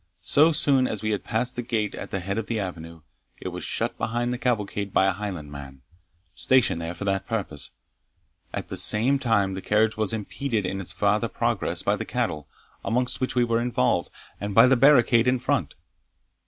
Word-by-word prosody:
So 155 Hz, -, +5 dB
soon 135 Hz, -4 st, +4 dB
as 110 Hz, -, -4 dB
we 110 Hz, -, 0 dB
had 105 Hz, -, -2 dB
passed 120 Hz, +3 st, -1 dB
the 120 Hz, -, -2 dB
gate 115 Hz, -4 st, -2 dB
at -, -, -7 dB
the 95 Hz, -, -3 dB
head 100 Hz, +4 st, -2 dB
of 115 Hz, -, -5 dB
the 115 Hz, -2 st, -2 dB
avenue, 85 Hz, -4 st, -7 dB, 0.4 s
it -, -, -5 dB
was -, -, -7 dB
shut -, -, -2 dB
behind 120 Hz, +2 st, -1 dB
the 125 Hz, -, -5 dB
cavalcade 105 Hz, -5 st, -2 dB
by 95 Hz, -, +3 dB
a 95 Hz, -, +3 dB
Highland 90 Hz, -6 st, -6 dB
man, 70 Hz, -2 st, -10 dB, 0.5 s
stationed 130 Hz, -10 st, +2 dB
there 85 Hz, +2 st, -5 dB
for 100 Hz, -, -6 dB
that 95 Hz, -1 st, -1 dB
purpose. -, -, -3 dB, 0.8 s
At -, -, -5 dB
the -, -, -4 dB
same 130 Hz, +6 st, +4 dB
time 100 Hz, -7 st, +1 dB
the 95 Hz, -, -5 dB
carriage 110 Hz, +2 st, +1 dB
was 110 Hz, -2 st, 0 dB
impeded 110 Hz, +1 st, -3 dB
in 95 Hz, +1 st, -3 dB
its 95 Hz, -, -2 dB
farther 105 Hz, +1 st, +1 dB
progress -, -, -2 dB
by -, -, +1 dB
the -, -, -4 dB
cattle, 75 Hz, -2 st, -3 dB, 0.4 s
amongst 125 Hz, +3 st, -1 dB
which 130 Hz, -, -1 dB
we 125 Hz, -, +3 dB
were 115 Hz, -1 st, +1 dB
involved, 120 Hz, -, 0 dB, 0.3 s
and 100 Hz, 0 st, -4 dB
by -, -, +8 dB
the 130 Hz, +1 st, +4 dB
barricade 125 Hz, -3 st, +5 dB
in 125 Hz, +1 st, +3 dB
front. 125 Hz, -, -1 dB
110 Hz, 200 wpm, -25 LUFS, 95-125 Hz, 0.8 s, by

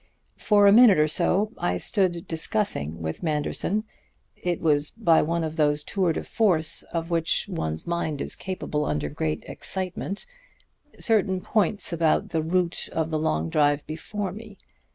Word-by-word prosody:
"For 205 Hz, -1 st, +4 dB
a 200 Hz, -, +7 dB
minute 220 Hz, -2 st, +7 dB
or 150 Hz, 0 st, +3 dB
so 185 Hz, +6 st, +2 dB
I 90 Hz, 0 st, -1 dB
stood 175 Hz, -, 0 dB
discussing 160 Hz, -, -1 dB
with 80 Hz, 0 st, -4 dB
Manderson 165 Hz, +6 st, -1 dB, 0.5 s
it 175 Hz, -1 st, -3 dB
was 150 Hz, -2 st, +1 dB
by 170 Hz, -8 st, +2 dB
one 165 Hz, +2 st, -1 dB
of 160 Hz, 0 st, -5 dB
those 150 Hz, -1 st, +1 dB
tours 180 Hz, -3 st, -1 dB
de -, -, -3 dB
force 170 Hz, -8 st, +3 dB
of 165 Hz, 0 st, -4 dB
which 165 Hz, +3 st, 0 dB
one's 80 Hz, -, -4 dB
mind 170 Hz, -4 st, -2 dB
is -, -, -2 dB
capable 180 Hz, -5 st, -4 dB
under 75 Hz, -1 st, -2 dB
great 75 Hz, +1 st, -3 dB
excitement 190 Hz, +1 st, -3 dB, 0.7 s
certain 195 Hz, -4 st, +2 dB
points 205 Hz, -1 st, +1 dB
about 165 Hz, -2 st, +1 dB
the 160 Hz, -, -1 dB
route 175 Hz, +2 st, 0 dB
of 160 Hz, 0 st, -2 dB
the 155 Hz, -, -1 dB
long 80 Hz, -, -1 dB
drive 145 Hz, -, +1 dB
before 190 Hz, +5 st, -5 dB
me. 210 Hz, 0 st, -11 dB
165 Hz, 155 wpm, -25 LUFS, 150-190 Hz, 0.7 s, a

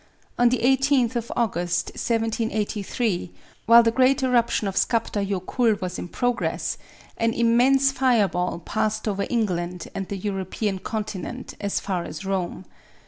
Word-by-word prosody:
On 245 Hz, 0 st, +6 dB
the 255 Hz, -, +1 dB
18th 265 Hz, 0 st, +2 dB
of 235 Hz, -1 st, -3 dB
August, 175 Hz, -6 st, 0 dB
1783, 220 Hz, -3 st, -1 dB, 0.4 s
while 235 Hz, +1 st, +8 dB
the 230 Hz, -, +3 dB
great 260 Hz, +3 st, +3 dB
eruption 235 Hz, -4 st, +2 dB
of 195 Hz, -, -2 dB
Skaptar 225 Hz, -3 st, +1 dB
Jokull 200 Hz, +3 st, 0 dB
was 180 Hz, -1 st, -4 dB
in -, -, -5 dB
progress, 245 Hz, +6 st, -1 dB, 0.4 s
an 230 Hz, 0 st, +1 dB
immense 250 Hz, +4 st, +4 dB
fire 250 Hz, -6 st, +3 dB
ball 180 Hz, -1 st, -2 dB
passed 215 Hz, +5 st, -2 dB
over 200 Hz, -1 st, -1 dB
England 180 Hz, -6 st, -2 dB
and 195 Hz, -1 st, -4 dB
the 200 Hz, -, -4 dB
European 195 Hz, +1 st, -3 dB
continent 215 Hz, +4 st, -5 dB
as 200 Hz, -1 st, -1 dB
far 185 Hz, -3 st, -2 dB
as 195 Hz, -, -7 dB
Rome. 190 Hz, -1 st, -3 dB
220 Hz, 140 wpm, -24 LUFS, 190-240 Hz, 0.4 s, while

